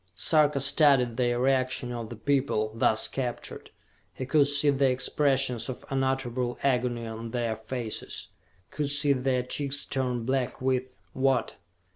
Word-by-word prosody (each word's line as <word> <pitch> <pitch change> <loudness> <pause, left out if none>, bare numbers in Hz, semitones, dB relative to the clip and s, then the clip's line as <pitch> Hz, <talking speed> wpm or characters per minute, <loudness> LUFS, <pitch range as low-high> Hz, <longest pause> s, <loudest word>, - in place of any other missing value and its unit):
Sarka 150 - +3
studied 135 -3 +4
the 120 0 +1
reaction 130 -1 0
of 115 -2 -5
the 120 - -7
people, 115 -3 0
thus 110 -1 +2
captured. 125 -3 -5 0.5
He 130 - -4
could 140 +1 +3
see 145 0 +3
the 135 -1 +2
expressions 130 -2 0
of 130 +2 -7
unutterable 130 -2 -1
agony 125 -3 0
on 115 +1 -6
their 115 -1 -2
faces, 110 0 -6 0.4
could 145 -2 -2
see 145 0 +3
their 130 -1 0
cheeks 140 +2 -2
turn 125 -3 -2
black 130 0 -1
with 130 0 -1 0.2
what? 130 -3 +1
130 Hz, 140 wpm, -27 LUFS, 120-135 Hz, 0.5 s, studied